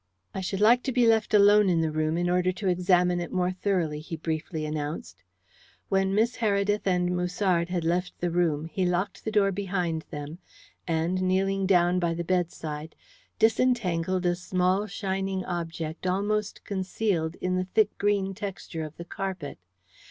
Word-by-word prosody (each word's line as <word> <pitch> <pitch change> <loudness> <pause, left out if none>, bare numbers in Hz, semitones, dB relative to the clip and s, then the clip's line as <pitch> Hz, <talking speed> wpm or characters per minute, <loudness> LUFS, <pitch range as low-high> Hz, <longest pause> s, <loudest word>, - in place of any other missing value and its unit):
"I 190 - -3
should 190 +2 -3
like 235 +4 +6
to 265 - 0
be 245 -1 +3
left 225 -1 +3
alone 205 -1 +6
in 170 -2 +2
the 160 -1 0
room 155 +1 0
in 175 0 0
order 180 +1 +2
to 190 +2 -4
examine 180 0 +3
it 175 - -5
more 180 -1 +1
thoroughly," 180 -5 -1
he 165 +2 -6
briefly 160 0 -3
announced. 145 - -5 0.7
When 195 0 +2
Miss 225 +3 +2
Heredith 205 -2 +1
and 180 -1 +1
Musard 180 -1 0
had 180 -2 -1
left 175 +2 -1
the 175 -1 -1
room 165 -3 +1
he 185 +3 -2
locked 180 +2 -1
the 220 - -3
door 200 -2 +3
behind 180 -4 -2
them, 150 +3 -7 0.5
and, 170 +3 0
kneeling 190 +1 +1
down 180 -1 +4
by 170 -1 0
the 170 - -3
bedside, 160 -3 -2 0.4
disentangled 185 -7 +1
a 175 - +3
small 185 +2 0
shining 195 -2 -2
object 165 -1 -4
almost 205 +3 -1
concealed 190 -4 -1
in 185 0 -2
the 185 0 0
thick 210 +2 +1
green 200 -1 +1
texture 195 -4 -6
of 155 0 -8
the 170 - -7
carpet. 185 - -5
180 Hz, 165 wpm, -27 LUFS, 170-195 Hz, 0.7 s, like